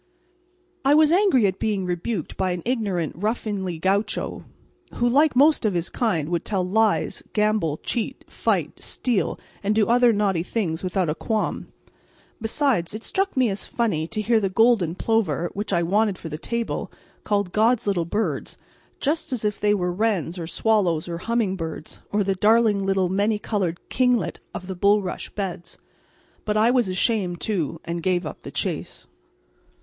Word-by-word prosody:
I 280 Hz, +2 st, +5 dB
was 310 Hz, 0 st, +5 dB
angry 355 Hz, -, +4 dB
at 190 Hz, -1 st, 0 dB
being 205 Hz, -4 st, -1 dB
rebuked 175 Hz, +1 st, -3 dB
by 185 Hz, -1 st, 0 dB
an 175 Hz, -, -5 dB
ignorant 205 Hz, -, -1 dB
ruffianly 200 Hz, -3 st, -2 dB
gaucho, 200 Hz, +5 st, -1 dB, 0.5 s
who 240 Hz, -, +1 dB
like 285 Hz, +3 st, +4 dB
most 295 Hz, +3 st, +5 dB
of 210 Hz, -4 st, +1 dB
his 170 Hz, 0 st, -1 dB
kind 170 Hz, -, 0 dB
would 175 Hz, -1 st, -1 dB
tell 195 Hz, -4 st, -1 dB
lies, 220 Hz, +2 st, +1 dB
gamble, 210 Hz, -8 st, +1 dB
cheat, 235 Hz, +5 st, -3 dB
fight, -, -, -1 dB
steal, 240 Hz, -6 st, -1 dB, 0.2 s
and 210 Hz, +1 st, 0 dB
do 215 Hz, -1 st, +4 dB
other 245 Hz, 0 st, +5 dB
naughty 200 Hz, -5 st, +1 dB
things 175 Hz, -3 st, -2 dB
without 185 Hz, -1 st, 0 dB
a 150 Hz, -, +1 dB
qualm. 215 Hz, +6 st, -2 dB, 0.7 s
Besides, 225 Hz, -, 0 dB
it 220 Hz, -, -6 dB
struck 390 Hz, -5 st, -1 dB
me 250 Hz, -5 st, +3 dB
as 195 Hz, -, -5 dB
funny 190 Hz, -10 st, -1 dB
to 215 Hz, +4 st, -3 dB
hear 225 Hz, +1 st, +3 dB
the 195 Hz, -2 st, 0 dB
golden 200 Hz, -5 st, +3 dB
plover, 185 Hz, -7 st, 0 dB
which 205 Hz, +1 st, -4 dB
I 175 Hz, -2 st, +2 dB
wanted 200 Hz, +2 st, +1 dB
for 165 Hz, -, -8 dB
the 150 Hz, -, -5 dB
table, 235 Hz, +4 st, -3 dB, 0.3 s
called 200 Hz, -3 st, 0 dB
"God's 225 Hz, +2 st, +3 dB
little 190 Hz, -5 st, 0 dB
birds," 210 Hz, +6 st, -2 dB, 0.4 s
just 310 Hz, +1 st, -1 dB
as 240 Hz, -4 st, -2 dB
if 210 Hz, -1 st, -1 dB
they 210 Hz, 0 st, +3 dB
were 180 Hz, -2 st, -1 dB
wrens 190 Hz, -4 st, -1 dB
or 165 Hz, -, -5 dB
swallows 180 Hz, -5 st, +1 dB
or 170 Hz, -1 st, -4 dB
humming 225 Hz, -2 st, 0 dB
birds, 160 Hz, -3 st, -6 dB
or 205 Hz, 0 st, +2 dB
the 195 Hz, 0 st, +1 dB
darling 210 Hz, +1 st, +3 dB
little 195 Hz, -1 st, +2 dB
many 205 Hz, +4 st, +1 dB
coloured 190 Hz, -5 st, -2 dB
kinglet 250 Hz, -2 st, +1 dB, 0.2 s
of 185 Hz, -, -5 dB
the 190 Hz, 0 st, -5 dB
bulrush 200 Hz, 0 st, +1 dB
beds. 185 Hz, -4 st, -5 dB, 0.7 s
But 210 Hz, -1 st, 0 dB
I 225 Hz, +3 st, +4 dB
was 245 Hz, -6 st, +2 dB
ashamed, 185 Hz, -2 st, 0 dB
too, 170 Hz, -7 st, -2 dB
and 170 Hz, 0 st, -3 dB
gave 180 Hz, -1 st, 0 dB
up 155 Hz, -, -7 dB
the -, -, -8 dB
chase. -, -, -3 dB
205 Hz, 170 wpm, -24 LUFS, 180-225 Hz, 0.7 s, I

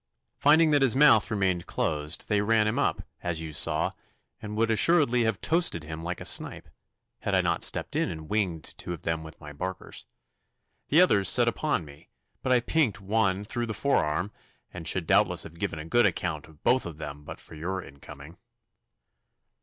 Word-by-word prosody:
Finding 155 Hz, +2 st, +5 dB
that 145 Hz, -1 st, +3 dB
his 130 Hz, -2 st, +3 dB
mouth 130 Hz, -7 st, +5 dB
remained 95 Hz, -5 st, -1 dB
closed, 75 Hz, +2 st, -2 dB
they 105 Hz, -1 st, +1 dB
ran 110 Hz, +1 st, +2 dB
him 110 Hz, -, -1 dB
up, -, -, 0 dB, 0.2 s
as 85 Hz, -2 st, -3 dB
you 80 Hz, -1 st, -7 dB
saw, -, -, +1 dB, 0.5 s
and 105 Hz, 0 st, -6 dB
would 115 Hz, 0 st, +2 dB
assuredly 125 Hz, -, +3 dB
have 110 Hz, -3 st, -1 dB
toasted 165 Hz, -, +1 dB
him 80 Hz, +1 st, -7 dB
like 85 Hz, +1 st, -4 dB
a -, -, -8 dB
snipe, -, -, -2 dB, 0.5 s
had -, -, -1 dB
I -, -, +4 dB
not -, -, -1 dB
stepped -, -, 0 dB
in -, -, +1 dB
and 80 Hz, -1 st, -7 dB
winged 95 Hz, -6 st, -1 dB, 0.2 s
two 90 Hz, -, -5 dB
of 85 Hz, -, -9 dB
them 80 Hz, -1 st, -1 dB
with 80 Hz, 0 st, -11 dB
my 75 Hz, -1 st, -10 dB
barkers. 90 Hz, +5 st, -7 dB, 0.8 s
The 160 Hz, +5 st, +5 dB
others 100 Hz, -, +4 dB
set 120 Hz, -2 st, +4 dB
upon 120 Hz, -, -1 dB
me, 70 Hz, 0 st, -15 dB, 0.3 s
but 130 Hz, -, -1 dB
I 125 Hz, -1 st, +4 dB
pinked 120 Hz, -, 0 dB
one 100 Hz, -1 st, 0 dB
through 120 Hz, +3 st, -3 dB
the 110 Hz, -, -4 dB
forearm, 100 Hz, -, 0 dB, 0.4 s
and 85 Hz, -2 st, -7 dB
should 95 Hz, -1 st, +1 dB
doubtless 95 Hz, -1 st, +2 dB
have 85 Hz, +1 st, -12 dB
given 80 Hz, -, -3 dB
a 75 Hz, -, -7 dB
good 115 Hz, +6 st, +3 dB
account 80 Hz, -5 st, -3 dB
of 80 Hz, -2 st, -20 dB
both 130 Hz, -6 st, +2 dB
of 80 Hz, -3 st, -8 dB
them 75 Hz, -1 st, -7 dB
but -, -, -9 dB
for -, -, -14 dB
your 90 Hz, +5 st, -4 dB
incoming. 70 Hz, +4 st, -13 dB
95 Hz, 195 wpm, -27 LUFS, 80-115 Hz, 0.8 s, Finding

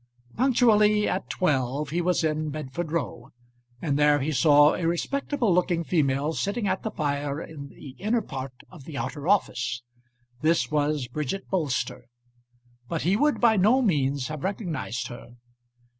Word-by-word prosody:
Punctually 215 Hz, -4 st, +4 dB
at 185 Hz, +1 st, -2 dB
twelve 140 Hz, -3 st, 0 dB
he 175 Hz, +2 st, 0 dB
was 180 Hz, -1 st, +1 dB
in 155 Hz, -1 st, 0 dB
Bedford 155 Hz, +2 st, -5 dB
Row, 140 Hz, -7 st, -3 dB, 0.5 s
and 145 Hz, -3 st, 0 dB
there 150 Hz, 0 st, +5 dB
he 145 Hz, +3 st, -1 dB
saw 145 Hz, +1 st, +5 dB
a 165 Hz, -, -1 dB
respectable 240 Hz, -, 0 dB
looking 175 Hz, -1 st, +1 dB
female 150 Hz, -2 st, +1 dB
sitting 205 Hz, +5 st, -1 dB
at 190 Hz, 0 st, 0 dB
the 220 Hz, -, -3 dB
fire 145 Hz, -4 st, -2 dB
in 150 Hz, -4 st, -8 dB
the 140 Hz, -, -12 dB
inner 220 Hz, +3 st, 0 dB
part 130 Hz, -5 st, -7 dB
of 160 Hz, -8 st, -13 dB
the 150 Hz, -3 st, -7 dB
outer 145 Hz, +2 st, -4 dB
office. 120 Hz, -, +1 dB, 0.6 s
This 160 Hz, +1 st, +2 dB
was 150 Hz, -3 st, 0 dB
Bridget 150 Hz, +9 st, -4 dB
Bolster, 145 Hz, -9 st, -1 dB, 0.8 s
but 165 Hz, -, -2 dB
he 185 Hz, +4 st, +3 dB
would 295 Hz, +6 st, +2 dB
by 225 Hz, -3 st, +4 dB
no 215 Hz, +8 st, +4 dB
means 140 Hz, -, +1 dB
have 155 Hz, -2 st, -6 dB
recognised 180 Hz, -, -3 dB
her. 120 Hz, 0 st, -11 dB
155 Hz, 155 wpm, -26 LUFS, 140-190 Hz, 0.8 s, there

